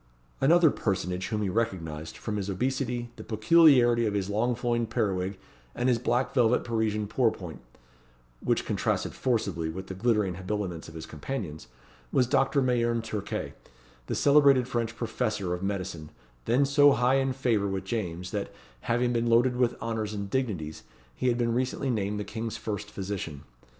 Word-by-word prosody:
Another 165 +2 +5
personage 95 -2 -2
whom 105 -2 -1
he 100 - 0
recognised, 80 -7 -3
from 105 -2 -4
his 100 -1 -3
obesity, 125 +2 -2
the - - -8
peculiarity 120 -1 +5
of 105 - -1
his 100 0 -1
long 120 +4 +1
flowing 120 -1 0
periwig, 95 -2 -1 0.4
and 125 - 0
his 120 -2 +3
black 125 +2 0
velvet 125 -2 +3
Parisian 110 -2 0
pourpoint, 105 -7 -1 0.8
which - - +1
contrasted - - -1
forcibly 100 -10 -1
with 95 +4 -6
the 95 - -6
glittering 105 -2 +1
habiliments 95 -3 -4
of 80 - -13
his 80 - -6
companions, 80 - -6 0.4
was 125 - +3
Doctor 135 +2 +2
Mayerne 120 -2 +1
Turquet, 105 -2 -4 0.5
the - - -2
celebrated 140 -3 +5
French 115 -2 -2
professor 110 -5 -2
of 90 - -4
medicine, 95 -6 -4 0.4
then 130 +4 +3
so 145 0 +6
high 125 +2 +3
in 135 0 +1
favour 120 -6 +1
with 95 -1 -2
James, 90 -5 -3
that, 105 -2 -3 0.3
having 120 - 0
been 120 0 0
loaded 120 +2 +4
with 125 -1 +1
honours 110 -2 -3
and 100 -1 -5
dignities, 95 -13 -2 0.3
he 125 - -2
had 120 -1 +2
been 120 -1 +1
recently 130 +2 -1
named 105 -2 -1
the - - -2
King's 110 +1 -5
first 105 -2 -4
physician. 95 -8 -5
110 Hz, 165 wpm, -28 LUFS, 95-125 Hz, 0.8 s, so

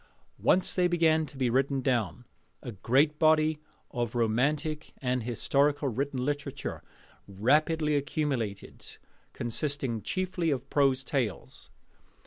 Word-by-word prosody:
Once 185 - +2
they 180 -1 +3
began 160 -3 +2
to 140 - -13
be 130 -2 +1
written 135 +3 +1
down, 120 - -1 0.4
a 120 - -5
great 135 +9 +2
body 155 -1 +3 0.3
of 120 -2 -3
romantic 145 +7 0
and 125 -1 -1
historical 140 +5 +1
written 130 +1 -2
literature 145 0 -4 0.5
rapidly 150 - +2
accumulated, 140 -8 -3 0.3
consisting 120 -1 -2
chiefly 185 - -2
of 135 -2 -2
prose 135 -2 +2
tales. 125 - -3
140 Hz, 115 wpm, -29 LUFS, 120-155 Hz, 0.5 s, they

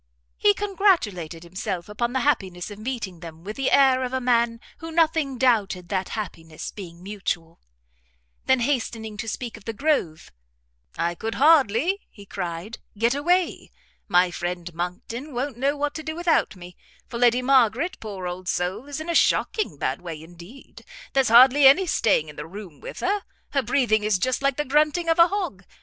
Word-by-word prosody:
He 410 -1 +3
congratulated 330 - 0
himself 185 0 -5
upon 235 +3 -2
the 260 +1 0
happiness 195 -9 -1
of 205 - -9
meeting 215 -7 -5
them 165 -1 -10
with 210 +3 -6
the 270 - 0
air 265 -2 +4
of 250 0 -4
a 260 - +1
man 235 -2 +1 0.2
who 325 0 -7
nothing 315 -4 +1
doubted 205 -8 +1
that 190 -2 -1
happiness 165 -6 -6
being 175 -3 -10
mutual; 190 -5 -4 0.9
then 260 -1 +4
hastening 230 -4 -2
to 220 - -5
speak 235 0 -5
of 215 - -17
the 225 - -3
Grove, 220 - -1 0.7
"I 170 +1 0
could 220 +5 -5
hardly," 295 - +4
he 200 -2 -14
cried, 180 +3 -5 0.2
"get 230 +3 +2
away; 350 +6 0 0.4
my 180 -2 +3
friend 175 +1 -4
Monckton 225 - -5
won't 260 +1 -2
know 280 +3 0
what 290 0 -1
to 315 - -5
do 315 0 -5
without 340 - +1
me, 180 -1 -12 0.3
for 235 - -6
Lady 245 +1 +4
Margaret, 260 - +2
poor 200 -4 -7
old 180 +1 -5
soul, 185 +9 -2
is 290 +1 -5
in 315 - -7
a 340 - -1
shocking 430 +5 +1
bad - - -2
way 165 -3 -7
indeed; 175 +10 -14 0.3
there's 270 -3 +3
hardly 260 +4 +8
any 350 +8 +6
staying 215 - +2
in 150 - -11
the - - -6
room 185 -4 -10
with - - -8
her; 405 +2 0 0.3
her 275 - +2
breathing 235 -3 +1
is 210 -2 +2
just 255 +7 -1
like 275 -1 +1
the 295 - -1
grunting 305 +5 +2
of 330 +1 +2
a 335 - +8
hog. 360 - -3
235 Hz, 180 wpm, -24 LUFS, 185-280 Hz, 0.9 s, hardly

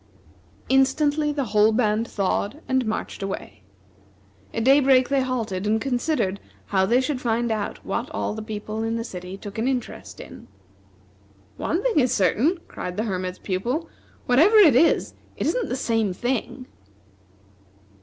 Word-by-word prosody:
Instantly, 290 +3 +2
the 285 -1 -1
whole 210 +1 +5
band 220 0 +1
thawed 200 +6 -1
and 260 -2 +1
marched 215 - -4
away. 195 - -6 0.9
At 230 - -2
daybreak 265 -1 +5
they 275 -1 +2
halted, 225 -7 -2
and 220 +1 +2
considered 245 -6 -1 0.3
how 190 -1 +1
they 240 +4 +4
should 260 -1 -2
find 235 0 0
out 215 -2 -4
what - - -3
all - - -3
the 220 - -6
people 215 0 -5
in 225 0 -1
the 230 - -2
city 185 -3 -7
took 205 +2 -8
an 230 - 0
interest 255 -3 -4
in. - - -11 1.1
"One 345 +6 -1
thing 475 -11 +2
is 250 -2 +2
certain," 230 - +2
cried 180 +1 -6
the 215 - 0
Hermit's 185 -4 -3
Pupil, 240 - -3 0.4
"whatever 315 - +4
it 370 - +7
is, 325 +6 +3 0.2
it - - -2
isn't - - 0
the - - -1
same 225 -6 0
thing." 245 +4 -3
235 Hz, 155 wpm, -24 LUFS, 210-270 Hz, 1.1 s, it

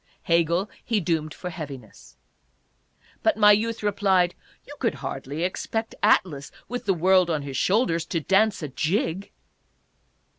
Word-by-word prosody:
Hegel 170 +3 +2 0.2
he 225 -3 0
doomed 160 -3 -1
for 180 +3 -7
heaviness. 145 -6 -10 1.0
But 325 - +2
my 210 -1 +7
youth 225 +2 +1
replied: 195 -3 +2 0.2
" - - -32
You - - -10
could - - 0
hardly 145 +5 -5
expect 220 +5 -3
Atlas, 140 -6 +2 0.2
with 245 +1 -5
the 195 - +3
world 185 +1 +4
on 155 -3 -1
his 140 -1 -6
shoulders, 175 - +1
to 165 - -1
dance 195 +3 +2
a - - -2
jig." 165 +6 -1
180 Hz, 145 wpm, -25 LUFS, 160-205 Hz, 1.0 s, my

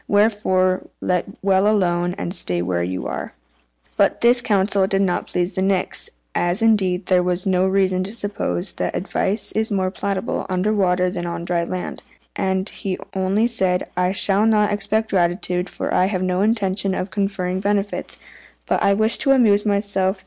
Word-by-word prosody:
Wherefore 205 -3 +2
let 180 -1 -1 0.2
well 195 0 +3
alone, 175 -4 +1
and 180 -3 -4
stay 90 - +1
where 90 -1 -1
you 90 +1 -3
are." - - -5 0.6
But - - +2
this 240 +1 +5
counsel 200 -3 +1
did 195 0 +1
not 180 -2 -1
please 180 +1 -2
the 190 - -2
Nix 190 -1 0 0.2
(as, 175 +5 0
indeed, 190 -5 +2
there 180 -1 +2
is 180 0 -2
no 185 -1 +2
reason 190 -1 +1
to 200 - -7
suppose 205 - -3
that - - -2
advice 205 +3 0
is 220 +1 -1
more 190 -3 0
palatable 195 -1 -3
under 185 +3 0
water 180 -3 +1
than 175 -1 -4
on 170 0 -5
dry 175 -1 0
land) 180 +1 -5 0.3
and 190 0 -1
he 190 -3 -4 0.2
only 195 +3 +1
said, 190 -6 0
"I 180 +1 +1
shall 200 +2 +2
not 210 -2 +3
expect 220 +2 -1
gratitude, 180 0 0
for - - -4
I 185 - +3
have 185 -2 -2
no 185 0 0
intention 200 -3 +1
of 185 +1 -4
conferring 190 -2 -2
benefits; 200 +1 -2 0.5
but - - 0
I 200 - +3
wish 220 +2 +2
to 275 - +4
amuse 215 -5 +3
myself. 200 -1 0
190 Hz, 175 wpm, -21 LUFS, 180-205 Hz, 0.6 s, this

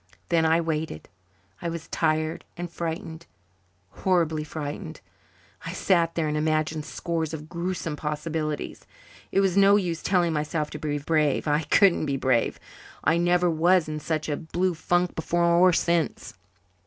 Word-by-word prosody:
Then 165 -1 +3
I 160 +1 +4
waited. 160 - -3 0.5
I 170 - -2
was 165 -1 -6
tired 155 0 0
and 175 -1 -5
frightened 165 0 -5 0.7
horribly 165 -5 +1
frightened. 155 +3 -6 0.6
I 165 - -5
sat 170 -3 +2
there 165 -2 0
and 150 - -1
imagined 155 0 0
scores 160 -2 -3
of 155 0 -9
gruesome 170 -2 -3
possibilities. 150 0 -4 0.4
It 195 - +3
was 190 -2 +1
no 200 0 +6
use 175 -5 -1
telling 175 -3 +2
myself 150 0 -2
to 150 - -6
be 145 -1 -2
brave. 150 0 +1
I 150 +1 +1
couldn't 175 0 +4
be 140 -1 0
brave. 130 -3 +1 0.4
I 160 - +3
never 175 +1 +3
was 170 +1 +3
in 155 0 -4
such 155 0 -2
a 150 - 0
blue 175 +3 -1
funk 175 +2 0
before 170 +2 0
or 170 +2 +5
since. 170 -1 0
160 Hz, 155 wpm, -26 LUFS, 155-175 Hz, 0.7 s, no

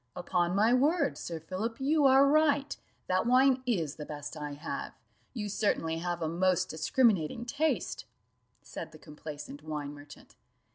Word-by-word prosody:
"Upon 175 0 0
my 220 +4 +4
word, 285 +3 +2
Sir 165 -2 -5
Philip, 190 - -4
you 290 +2 +2
are 270 +1 +7
right 290 -1 +3 0.3
that 185 +4 +1
wine 260 +1 +4
is 165 - -1
the 150 - -5
best 145 0 -7
I 150 -1 -5
have 145 - -6 0.4
you 210 -3 -3
certainly 190 -5 0
have 175 0 -3
a - - 0
most 180 +2 +1
discriminating 205 - +1
taste," 305 +6 -1 0.6
said - - -8
the - - -11
complaisant 150 -1 -9
wine 150 -2 -5
merchant. 145 0 -14
185 Hz, 150 wpm, -30 LUFS, 155-260 Hz, 0.6 s, are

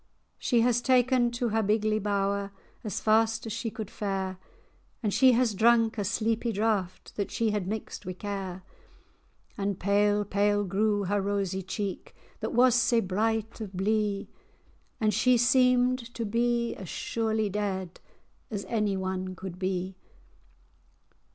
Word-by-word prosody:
She 240 -3 +2
has 245 0 +2
ta'en 255 0 +3
her - - +2
to 240 0 -2
her 220 +1 +1
bigly 215 +1 +1
bower 200 -1 -1 0.3
As 210 -5 -3
fast 225 +1 +2
as 220 - -4
she 225 0 -3
could 215 -1 -7
fare; 190 -2 -3 0.6
And 210 -2 0
she 255 +3 +6
has 240 -2 +2
drank 225 +1 +3
a - - 0
sleepy 225 +3 0
draught, 205 -4 -1
That 200 - -1
she 225 -2 0
had 205 -3 -2
mixed 215 0 -5
wi' 185 -1 -5
care. 190 -1 -5 1.0
And 200 -1 -1
pale, 205 +1 +2
pale 205 +1 +1
grew 205 +2 +1
her 200 +2 0
rosy 195 -1 -1
cheek, 190 +1 -5 0.2
That - - -3
was 250 +1 +5
sae 240 -1 +3
bright 220 +3 -1
of 205 -3 -6
blee,[#] 205 +1 0 0.7
And 215 -1 +2
she 250 +4 +4
seemed 250 +1 +4 0.2
to 230 - -2
be 235 +2 0
as 185 -4 -8
surely 220 -2 -1
dead 190 -3 -3 0.5
As 205 -2 -4
any 210 -4 0
one 185 0 -3
could 180 0 -8
be. 185 0 -2
210 Hz, 150 wpm, -28 LUFS, 195-230 Hz, 1.0 s, she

